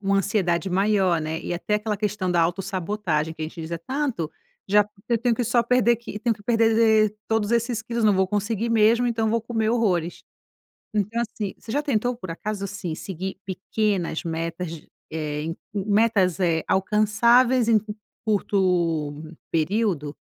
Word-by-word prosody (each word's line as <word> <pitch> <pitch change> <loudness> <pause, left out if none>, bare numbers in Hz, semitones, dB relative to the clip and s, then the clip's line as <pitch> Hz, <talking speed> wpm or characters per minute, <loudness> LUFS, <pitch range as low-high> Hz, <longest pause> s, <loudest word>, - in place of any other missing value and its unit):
uma 195 0 +2
ansiedade 195 -2 0
maior, 190 -2 +2
né. 160 +1 -3
E - - -4
até 185 +4 -1
aquela 210 0 -1
questão 205 -2 -1
da 175 -1 +3
autossabotagem, 175 -2 -1
que 160 - -7
a - - 0
gente 165 +2 -8
diz: 160 0 -6
"É 170 - -3
tanto, 255 - -2 0.4
já 210 +1 +5
porque 205 +2 -9
eu 235 - +3
tenho 240 +1 +2
que 245 - -1
só 235 +1 +3
perder 240 -1 +3
que 235 -3 -8
eu - - -6
tenho 230 +1 +1
que 205 - -18
perder 225 -1 +3
todos 220 -1 +1
esses 235 0 0
quilos. 235 0 -2
Não 210 - +5
vou 190 0 +2
conseguir 210 +3 -1
mesmo, 230 +2 +4
então 225 -2 0
vou 230 +1 +1
comer 225 -1 -1
horrores". 185 -8 0 0.7
Então, 215 +3 0
assim, 210 -3 -4
você 220 - -9
já 290 +5 0
tentou, 245 -3 0
por 185 -7 -7
acaso 205 +4 -4
assim, 190 -4 -4
seguir 190 +2 -5
pequenas 190 -2 -1
metas, 165 0 -4 0.2
eh, 150 -2 -3
en 165 +1 -3 0.2
hum, 200 -2 -2
metas, 200 -5 +3
eh, 165 -3 +1
alcançáveis 225 +5 +3
em 230 - +5
um 215 0 0 0.3
curto 180 -7 +1 0.4
período? 165 -3 0
205 Hz, 175 wpm, -24 LUFS, 175-225 Hz, 0.7 s, já